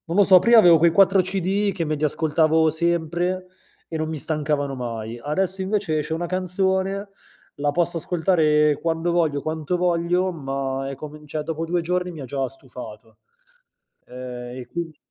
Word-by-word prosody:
non 165 - -3
lo 205 - +6
so, 185 -1 +7
prima 235 +5 +6
avevo 175 -6 +7
quei 170 +2 +5
4 195 +2 +5
CD, 190 +2 0
che 175 -3 -2
me 155 -1 -1
li 150 - -6
ascoltavo 160 +1 +2
sempre 170 +3 -1 0.4
e 165 - -4
non 155 0 -2
mi 160 - -4
stancavano 150 -1 0
mai, 115 -2 -5
adesso 190 +6 -1
invece 195 -5 -1
esce 150 - -3
una 170 +2 -2
canzone, 190 +2 -1 0.5
la 145 0 0
posso 170 +2 0
ascoltare 155 -4 +2
quando 165 +1 0
voglio, 160 -5 +1
quanto 155 +2 -2
voglio, 180 +1 +1
ma 135 -3 -3
è 135 - -6
come 150 +2 -9
n 150 - -16
cioè 150 +1 -3
dopo 165 0 -3
2 175 +1 -1
giorni 180 +1 -1
mi 165 -4 -9
ha - - -6
già 135 +1 -2
stufato. 115 -5 -12 0.9
Ehm, 125 0 -8
e 125 - -8
quindi 165 +1 -6
160 Hz, 180 wpm, -23 LUFS, 145-180 Hz, 0.9 s, so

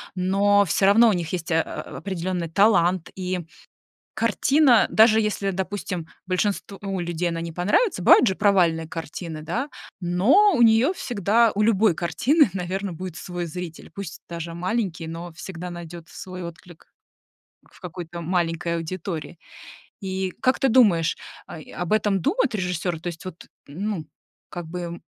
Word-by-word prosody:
Но 200 +2 +3
всё 190 +2 +1
равно 225 +4 +6
у - - +3
них 170 -2 -3
есть, 175 -2 -3
э - - +3
э, - - +4 0.4
определённый 180 -2 -3
талант 180 -3 +3
и 185 0 -2 0.8
картина, 240 +4 +4
даже 220 0 +6
если, 205 -2 -1
допустим, 190 -2 -4 0.2
большинству 195 0 -2
людей 175 0 -2
она 165 0 -3
не 165 0 -5
понравится, 180 - +1
бывают 245 - +7
же 190 - +1
провальные 175 -6 +2
картины, 165 -1 -6
да? 230 - -3 0.3
Но 220 - +4
у 245 - +2
неё 230 +6 +5
всегда, 230 - +2
у 210 - +2
любой 215 -2 +4
картины, 255 - +2
наверно, 190 +1 -3
будет 180 0 -7
свой 175 0 -5
зритель, 165 0 -7
пусть 195 -5 -7
даже 170 -1 -5
маленький, 180 -1 -2
но 165 +2 -6
всегда 180 +1 -7
найдёт 175 -1 -8
свой 185 0 -8
отклик 170 0 -11 0.9
в - - -19
какой-то 175 -1 -7
маленькой 170 0 -1
аудитории. 165 0 -5 0.7
И 190 -1 -2
как 255 - +2
ты 270 - +3
думаешь, 205 -10 +4 0.3
а, - - -9
и - - -14
об 175 -1 -3
этом 205 -2 +2
думают 290 - +1
режиссёры, 180 -3 -2
то 175 - -7
есть 170 -1 -9
вот, 185 -2 -9 0.2
ну, 185 +2 -4 0.4
как 175 -1 -6
бы 170 0 -6
180 Hz, 155 wpm, -24 LUFS, 170-205 Hz, 0.9 s, бывают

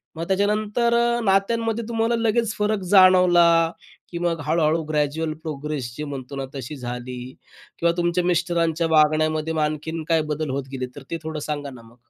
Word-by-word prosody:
मग 165 +1 -5
त्याच्यानंतर 210 +4 +1 0.3
नात्यांमध्ये 225 +3 +1
तुम्हाला 230 0 +1
लगेच 230 -1 +1
फरक 210 0 0
जाणवला, 175 -3 +6 0.4
की 170 - -4
मग 170 -1 -1
हळूहळू 160 +1 +1
ग्रॅज्युअल 155 +1 -1
प्रोग्रेस 145 -5 -4
जे 150 - -4
म्हणतो 140 -2 -7
ना 135 -1 -3
तशी 135 +3 -6
झाली 125 -1 -6 0.6
किंवा 170 0 +3
तुमच्या 175 +1 +1
मिस्टरांच्या 170 -2 +1
वागण्यामध्ये 155 0 +2
मग 160 - 0
आणखीन 155 +2 -3
काय 165 -1 +3
बदल 150 -1 -3
होत 135 +1 -2
गेले, 130 -2 -3
तर 145 - -9
ते 165 - -1
थोडं 160 -1 -4
सांगा 145 -1 -4
ना 125 -3 -12
मग? 115 +1 -18
160 Hz, 165 wpm, -23 LUFS, 150-185 Hz, 0.6 s, जाणवला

